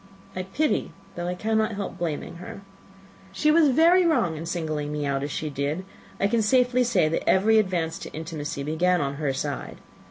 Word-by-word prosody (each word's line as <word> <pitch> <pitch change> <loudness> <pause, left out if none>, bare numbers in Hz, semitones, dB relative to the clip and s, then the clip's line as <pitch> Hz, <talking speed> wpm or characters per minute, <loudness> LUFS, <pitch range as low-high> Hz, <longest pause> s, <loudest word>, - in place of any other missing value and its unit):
I 185 - -2
pity, 240 +12 -1 0.2
though 175 0 -4
I 180 - -2
cannot 220 +2 0
help 200 -1 -4
blaming, 170 0 -3
her. 180 +3 -9 0.7
She 300 +10 +2
was 320 -1 +5
very 335 +7 +5
wrong 250 - +2
in 160 +2 -6
singling 155 -4 -3
me 150 -1 -2
out 140 -1 -1
as 145 - -3
she 155 +1 -3
did; 145 +6 -2 0.3
I - - +2
can 225 +3 +2
safely 250 +2 +3
say, 195 -10 +2
that 160 - -1
every 220 +4 +5
advance 175 -5 -1
to - - -8
intimacy 155 -3 -5
began 175 +5 +1
on 140 -1 -2
her 145 -3 +1
side. 140 0 -4
180 Hz, 190 wpm, -25 LUFS, 150-220 Hz, 0.7 s, was